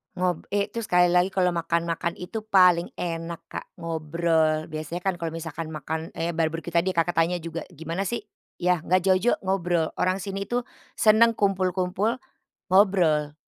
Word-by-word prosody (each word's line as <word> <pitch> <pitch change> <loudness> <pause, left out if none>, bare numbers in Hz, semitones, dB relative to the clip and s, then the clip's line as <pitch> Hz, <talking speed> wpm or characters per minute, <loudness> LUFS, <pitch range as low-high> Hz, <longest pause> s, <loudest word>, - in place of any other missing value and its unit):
Ngob 180 -2 -1
eh, 200 0 +1
itu 230 - -5
sekali 180 -4 +4
lagi 180 +2 +3
kalau 180 -2 +1
makan-makan 170 0 -1
itu 215 +5 -5
paling 180 -5 +4
enak 165 -1 -4
Kak, - - -6
ngobrol. 160 -1 0
Biasanya 155 +3 -5
kan 190 0 -1
kalau 165 -1 -4
misalkan 165 0 -6
makan, 160 +1 -5
eee, 170 0 -3
barbeque 165 +1 -1
tadi, 170 +2 +1
Kakak, 170 0 0
tanya 170 +2 +2
juga 165 0 -6
gimana 165 +5 -4
sih, 235 +5 -2 0.4
ya, 180 -2 +1
nggak 185 +2 +1
jauh-jauh 190 +5 +3
ngobrol. 175 -4 0
Orang 185 +1 0
sini 195 +1 -4
itu, 240 +5 -1 0.4
seneng 220 +2 +6
kumpul-kumpul, 195 +2 0 0.5
ngobrol. 175 -7 +3
175 Hz, 155 wpm, -25 LUFS, 165-190 Hz, 0.5 s, seneng